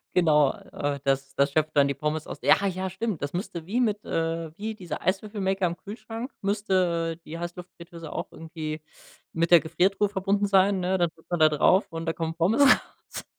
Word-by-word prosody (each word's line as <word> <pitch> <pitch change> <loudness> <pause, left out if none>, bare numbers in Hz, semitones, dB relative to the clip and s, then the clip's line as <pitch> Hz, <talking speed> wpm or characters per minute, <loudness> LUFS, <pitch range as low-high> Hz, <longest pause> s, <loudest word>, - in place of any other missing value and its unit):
Genau, 150 -5 +4
äh, 145 -1 -4
das 135 0 -1
das 140 0 +2
schöpft 155 +1 0
dann 140 0 +6
die 140 - 0
Pommes 150 +2 -2
aus - - -7
ja, 195 0 +6
ja, 185 0 -2
stimmt, 195 -3 -3
das 145 +2 -3
müsste 175 -3 -4
wie 235 +5 0
mit 210 -4 0
äh, 165 -1 -2
wie 220 +2 -4
dieser 180 -5 -6
Eiswürfelmaker 195 -1 0
am 170 +1 -4
Kühlschrank 225 +4 -7
müsste 185 -5 0
die 165 +2 -7
Heißluftfritteuse 170 -2 -8
auch - - -4
irgendwie 160 -2 -6 0.5
mit 170 +1 0
der 170 - +9
Gefriertruhe 190 +6 +1
verbunden 200 +1 0
sein, 195 0 +4
ne, 185 +1 0
dann 175 -2 +2
drückt 160 - -24
man 175 - 0
da 155 0 +7
drauf 180 +6 +3
und 165 0 -5
da 165 - 0
kommen 165 0 -3
Pommes 200 +11 +2
raus. 255 - +1
175 Hz, 195 wpm, -26 LUFS, 160-195 Hz, 0.5 s, der